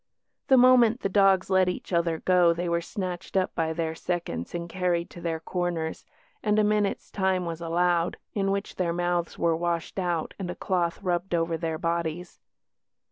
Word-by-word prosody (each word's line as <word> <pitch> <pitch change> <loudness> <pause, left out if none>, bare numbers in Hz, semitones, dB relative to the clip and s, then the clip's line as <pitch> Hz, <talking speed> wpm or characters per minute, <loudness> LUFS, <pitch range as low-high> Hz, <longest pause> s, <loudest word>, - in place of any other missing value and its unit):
The 265 - +6
moment 245 -2 +6
the 195 - 0
dogs 195 -1 +3
let 190 -1 +4
each 180 - -5
other 170 -1 +1
go 180 -2 +4
they 175 +1 -3
were 170 0 +1
snatched 180 0 -4
up 185 - +1
by 160 -1 -1
their 160 0 -2
seconds 165 - -4
and 170 0 -4
carried 175 -1 -1
to 175 - -10
their 165 -1 -2
corners, 170 -1 -3 0.4
and 210 -1 +1
a 215 - +4
minute's 210 -1 0
time 190 -2 0
was 165 0 -5
allowed, 170 +1 +1 0.2
in 195 -2 0
which 200 0 -3
their 170 -2 0
mouths 175 0 -1
were 170 -1 +2
washed 170 +2 -2
out 175 -3 -1
and 185 -2 -4
a 180 - -4
cloth 175 0 -1
rubbed 175 -1 0
over 165 0 0
their 160 -1 -2
bodies. 170 +1 -3
175 Hz, 185 wpm, -27 LUFS, 170-190 Hz, 0.4 s, The